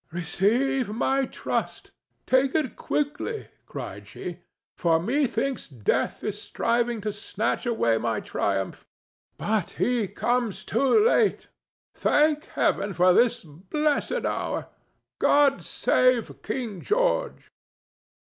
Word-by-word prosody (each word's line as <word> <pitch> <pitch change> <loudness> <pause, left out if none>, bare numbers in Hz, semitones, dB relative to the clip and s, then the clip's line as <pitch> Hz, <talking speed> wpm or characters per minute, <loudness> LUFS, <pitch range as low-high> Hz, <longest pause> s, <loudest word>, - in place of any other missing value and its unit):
"Receive 215 - +1
my 265 +5 +1
trust! - - -4 0.3
Take 260 +1 +2
it 300 -8 0
quickly," 295 +10 -2 0.2
cried - - -7
she, 180 -1 -7 0.4
"for 165 -2 +2
methinks 265 - -1
Death 125 -2 -1
is 210 0 -3
striving 235 0 0
to 210 0 -3
snatch 215 +4 -2
away 115 - +2
my 115 -3 -1
triumph. 95 -1 -2 0.5
But 210 -4 0
he 240 -4 +1
comes 235 +2 -1
too 275 - +3
late. 460 -2 +2 0.4
Thank 300 +1 +2
Heaven 200 0 0
for 180 +2 +5
this 240 +3 +3
blessed 290 - -1
hour! - - -2 0.5
God 285 -1 +4
save 255 -3 +1
King 215 -4 -4
George!" - - 0
235 Hz, 110 wpm, -26 LUFS, 190-275 Hz, 0.5 s, for